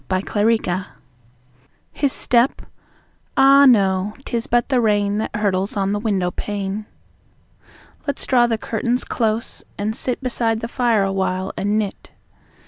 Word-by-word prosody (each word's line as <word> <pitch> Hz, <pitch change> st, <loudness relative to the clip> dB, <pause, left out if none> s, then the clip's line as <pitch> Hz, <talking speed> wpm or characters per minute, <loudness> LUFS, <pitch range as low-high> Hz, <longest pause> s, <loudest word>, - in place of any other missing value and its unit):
Listening 195 Hz, -1 st, 0 dB, 1.1 s
His 280 Hz, -2 st, 0 dB
step? 245 Hz, +1 st, +1 dB, 0.7 s
Ah, 275 Hz, +1 st, +7 dB
no; 195 Hz, -3 st, +3 dB
'tis 235 Hz, -2 st, -2 dB
but 240 Hz, +1 st, +1 dB
the 255 Hz, -3 st, +2 dB
rain 205 Hz, -2 st, +1 dB
That 220 Hz, -, -4 dB
hurtles 200 Hz, -1 st, -1 dB
on 195 Hz, 0 st, 0 dB
the 205 Hz, -, -1 dB
window 195 Hz, -5 st, 0 dB
pane. 205 Hz, +1 st, -4 dB, 1.2 s
Let's 285 Hz, -, -2 dB
draw 245 Hz, -2 st, +4 dB
the 225 Hz, -1 st, 0 dB
curtains 235 Hz, +3 st, -2 dB
close 225 Hz, -1 st, -2 dB
and 210 Hz, +2 st, -2 dB
sit 255 Hz, +2 st, -2 dB
Beside 230 Hz, -3 st, 0 dB
the 230 Hz, -, -3 dB
fire 235 Hz, -4 st, +1 dB
awhile 190 Hz, -1 st, -1 dB
and 205 Hz, +2 st, 0 dB
knit. 210 Hz, -3 st, -4 dB
215 Hz, 135 wpm, -20 LUFS, 195-240 Hz, 1.2 s, Ah